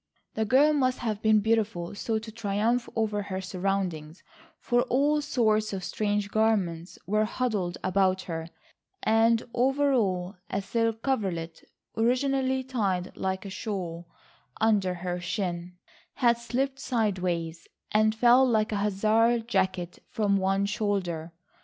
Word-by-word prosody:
The 220 - -1
girl 275 +7 +5
must 255 -3 +1
have 220 -3 -3
been 215 -1 +4
beautiful 215 -5 0
so 220 +2 -2
to 220 0 -7
triumph 225 +2 0
over 215 -2 0
her 190 -2 -4
surroundings, 185 -4 -3 0.4
for 245 0 +2
all 290 +3 +2
sorts 215 -7 +1
of 190 -1 -4
strange 205 +1 -1
garments 195 -6 0
were 215 +2 +2
huddled 210 -7 -2
about 190 0 +2
her, 165 -2 -5 0.6
and 225 +1 +3
over 270 +3 +2
all 185 -5 0
a 195 - -1
silk 225 +1 -1
coverlet 180 -11 -2 0.3
originally 260 +3 +1
tied 200 -9 -2
like 190 +1 -3
a 195 - -6
shawl 180 -5 -5 0.5
under 205 -5 +2
her 180 0 -4
chin, 175 -1 -4 0.4
had 235 -3 +3
slipped 265 +4 -2
sideways, 180 -9 -1 0.2
and 215 +1 +3
fell 245 +3 +6
like 220 -4 +2
a 210 - 0
Hussar's 220 +3 +2
jacket 185 -5 -1
from 205 -2 +1
one 195 +1 +1
shoulder. 195 -6 -2
210 Hz, 135 wpm, -27 LUFS, 185-230 Hz, 0.6 s, fell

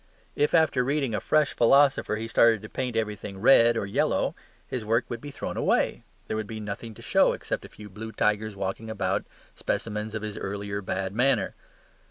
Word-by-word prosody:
If, 150 +3 +2
after 160 -6 +3
reading 135 -2 0
a 105 - 0
fresh 150 +5 +2
philosopher, 135 -1 +4
he 110 +1 -4
started 115 -2 +4
to 105 - -8
paint 125 -3 -3
everything 105 -3 -3
red 115 +1 +6
or - - -1
yellow, 100 - 0 0.3
his 125 -3 -4
work 115 +3 +1
would 120 -1 -5
be 145 - -7
thrown - - -5
away: - - +1 0.2
there - - -3
would 110 -1 -3
be 110 0 -6
nothing 105 +2 -6
to - - -13
show - - +4
except - - -4
a - - -11
few 105 - -12
blue 110 +3 -8
tigers 105 -1 0
walking 100 +3 -4
about, 95 -3 -1 0.3
specimens 105 0 -3
of 110 - -4
his 105 -1 -5
early 100 +1 -4
bad 95 0 -3
manner. 130 +5 +2
110 Hz, 195 wpm, -26 LUFS, 105-120 Hz, 0.3 s, red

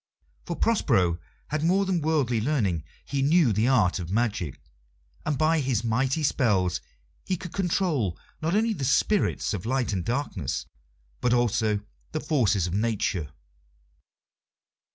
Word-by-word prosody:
For - - -2
Prospero 90 - +2 0.3
had 155 +1 -1
more 190 +4 +3
than 185 -3 0
worldly 140 -7 +1
learning; 105 - 0 0.2
he 140 -1 -2
knew 145 -3 +4
the 110 +4 +2
art 95 -9 +3
of 85 -2 -5
magic, 100 - -1 0.7
and 150 -2 +1
by 155 +2 +3
his 130 -5 0
mighty 130 +7 +1
spells 95 - +2 0.4
he 185 - -1
could 180 0 -8
control 165 - 0 0.2
not 165 +4 0
only 225 +1 +2
the 145 - -5
spirits 180 - +2
of 95 -4 -3
light 130 -3 0
and 90 -3 -1
darkness, 100 - -2 0.5
but 125 - +2
also 110 -3 +1 0.3
the 155 - 0
forces 115 - +2
of 90 - -3
Nature. 100 -7 0
125 Hz, 140 wpm, -26 LUFS, 100-155 Hz, 0.7 s, knew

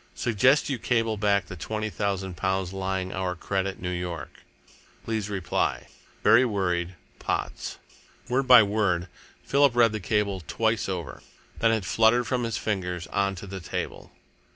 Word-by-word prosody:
Suggest 125 +6 +3
you 135 -4 -2
cable 115 -2 +1
back 100 -2 +2
the 90 - -8
twenty 110 +4 -3
thousand 95 -3 -2
pounds 95 0 -1
lying 95 -1 -2
our 95 -1 -2
credit 95 +2 -2
New 90 0 -3
York. 90 -2 -5 0.6
Please 110 -2 -2
reply. 95 -4 -1 0.3
Very 115 +4 +7
worried. 90 -6 -1 0.2
Potts." - - -3 0.5
Word 130 +2 0
by 120 - +9
word, 100 -4 0 0.3
Philip 140 -3 +3
read 115 -2 +5
the 110 - -3
cable 100 -1 0
twice 110 -2 0
over. 90 -4 -5 0.4
Then 115 - +4
it 110 -3 0
fluttered 115 +2 +3
from 125 -1 -1
his 115 - -2
fingers 90 -5 -2
on 100 0 +1
to 95 - -8
the 95 0 -6
table. 85 - -5
100 Hz, 150 wpm, -26 LUFS, 95-115 Hz, 0.6 s, by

